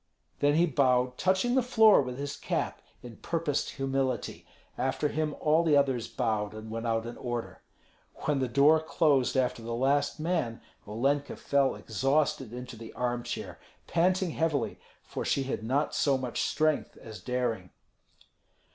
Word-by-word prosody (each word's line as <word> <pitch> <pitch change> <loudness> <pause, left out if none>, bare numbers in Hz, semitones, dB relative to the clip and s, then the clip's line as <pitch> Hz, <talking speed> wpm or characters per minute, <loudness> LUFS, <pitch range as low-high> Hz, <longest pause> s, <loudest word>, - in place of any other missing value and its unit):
Then 145 +1 +3
he 170 +2 +5
bowed, 125 -4 +2
touching 190 +6 +2
the 260 - +4
floor 225 - +6
with 125 -2 -5
his 140 0 -4
cap - - -3 0.2
in 120 -3 -10
purposed 165 -4 -1
humility; 135 -1 -2 0.3
after 135 +3 -1
him 155 0 -2
all 155 +2 +3
the 155 -3 +4
others 130 -5 +1
bowed, 110 -4 -2
and 110 0 -8
went 115 +1 -3
out 115 0 0
in 120 - -7
order. 120 -2 -5 0.6
When 145 -2 +1
the 130 - 0
door 140 +5 +5
closed 145 -4 +2
after 125 -2 0
the 115 +1 -4
last 140 +4 +1
man, 155 -8 -1 0.3
Olenka 140 +7 0
fell 140 -2 +1
exhausted 135 +1 0
into 125 0 -7
the 115 0 -10
armchair, 120 -1 -3 0.3
panting 180 +1 +1
heavily, 145 -9 -1 0.2
for - - -5
she 140 - +1
had 130 -4 -3
not 135 +6 0
so 140 -2 +2
much 125 -2 -3
strength 155 0 0
as 110 -2 -10
daring. 120 -7 -2
135 Hz, 155 wpm, -29 LUFS, 120-150 Hz, 0.6 s, floor